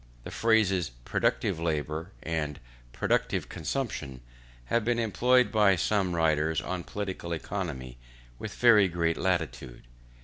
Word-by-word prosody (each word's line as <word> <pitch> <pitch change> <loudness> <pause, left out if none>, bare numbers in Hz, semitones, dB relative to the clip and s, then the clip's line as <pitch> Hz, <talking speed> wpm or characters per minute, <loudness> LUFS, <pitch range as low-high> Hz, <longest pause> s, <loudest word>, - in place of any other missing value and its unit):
The - - -8
phrases 105 -6 +2 0.2
productive - - 0
labour, 80 +1 -2
and 75 -3 -2 0.3
productive - - 0
consumption, 75 - -4 0.4
have 115 - +1
been 120 +1 +1
employed 125 +3 +3
by 105 -3 +5
some 95 0 0
writers 80 -1 +2
on 90 0 -4
political 95 -4 -4
economy 75 -9 -5 0.4
with - - -6
very 110 -5 +6
great 85 -1 0
latitude. 80 -10 -2
85 Hz, 115 wpm, -28 LUFS, 80-105 Hz, 0.4 s, very